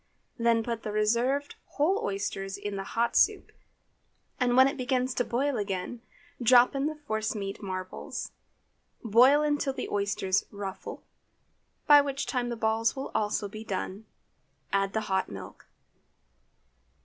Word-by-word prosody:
Then 230 -1 +3
put 230 -1 -3
the 215 - -4
reserved 235 +7 +1 0.2
whole 335 +8 +2
oysters 195 0 -3
into 200 0 -5
the 195 - -3
hot 230 +4 -1
soup, - - +3 0.9
and 250 -1 +2
when 260 +1 +8
it 275 - -2
begins 255 -1 0
to 245 - 0
boil 260 +3 -1
again, 200 +3 -3 0.4
drop 245 +1 +6
in 275 +1 0
the 310 - -3
force 220 -8 -3
meat 195 -1 -5
marbles. 185 -2 -5 0.7
Boil 250 +7 +5
until 290 -2 0
the - - -4
oysters 200 -1 0
"ruffle," 200 -1 -7 0.8
by 290 -1 +8
which 280 -1 -3
time 245 -2 -1
the 235 - -3
balls 225 +1 +1
will 270 - -5
also 210 -1 0
be 215 +2 -8
done. 200 +1 -5 0.7
Add 195 0 +1
the 220 - 0
hot 190 -3 -1
milk. 95 -1 -10
225 Hz, 145 wpm, -28 LUFS, 200-260 Hz, 0.9 s, when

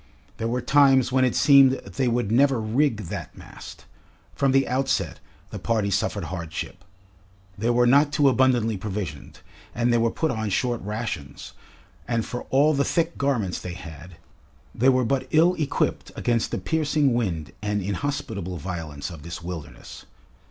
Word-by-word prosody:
There 115 - -2
were 125 +2 -1
times 135 -3 +4
when 130 0 +3
it 125 - +1
seemed 140 -3 +6
they 135 -1 -3
would 120 -3 0
never 135 +1 +3
rig 115 +1 0
that - - -7
mast. - - -12 0.5
From 135 -1 +1
the 135 0 +3
outset 125 - -1 0.3
the 105 - -6
party 105 0 0
suffered - - -1
hardship. 90 +1 -6 0.7
They 110 +4 -1
were 120 0 +3
not 140 +4 +4
too 145 0 +3
abundantly 120 -4 +2
provisioned, 95 -8 -6 0.3
and 120 +1 +1
they 120 - +3
were 115 0 +2
put 160 +5 -1
on 110 -2 -2
short 120 +4 -1
rations, 105 -9 -5 0.5
and 115 -2 -1
for 125 - -6
all 145 +4 +4
the 140 -1 +2
thick 170 +2 0
garments 125 -10 0
they 90 - -6
had, 85 0 -11 0.6
they 130 +3 +3
were 130 -1 +3
but 130 +2 -1
ill 165 +3 +4
equipped 145 -3 -1
against 115 -2 0
the - - -3
piercing 150 - +1
wind 85 -10 -2
and 105 0 -1
inhospitable 100 -3 -3
violence 75 -4 -6
of 80 -4 -10
this 85 +2 -8
wilderness. 85 -3 -9
120 Hz, 160 wpm, -24 LUFS, 95-135 Hz, 0.7 s, seemed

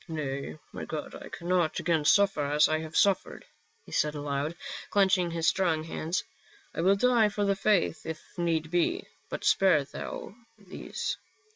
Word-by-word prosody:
" - - -27
Nay, 140 - -4
my - - -6
God, - - -5
I - - -9
cannot 175 -2 0
again 160 -3 +1
suffer 195 -2 +4
as 145 +2 +4
I 155 0 +1
have 160 0 -5
suffered," 200 -2 +2 0.4
he - - -14
said 150 0 +1
aloud, 145 +2 -2 0.3
clenching 190 -3 +3
his 165 -1 -1
strong 165 -5 +2
hands. 165 +2 -2 0.3
*' 405 -1 -28
I - - -2
will 190 +3 +5
die 235 0 +4
for 205 0 -1
the 200 0 +2
faith 195 -5 +1
if 160 -1 -5 0.2
need 165 -2 -1
be, 180 - +1 0.3
but - - -5
spare 185 -7 +4
thou 140 +6 -7 0.2
these." 200 -4 -5
170 Hz, 170 wpm, -29 LUFS, 155-195 Hz, 0.4 s, will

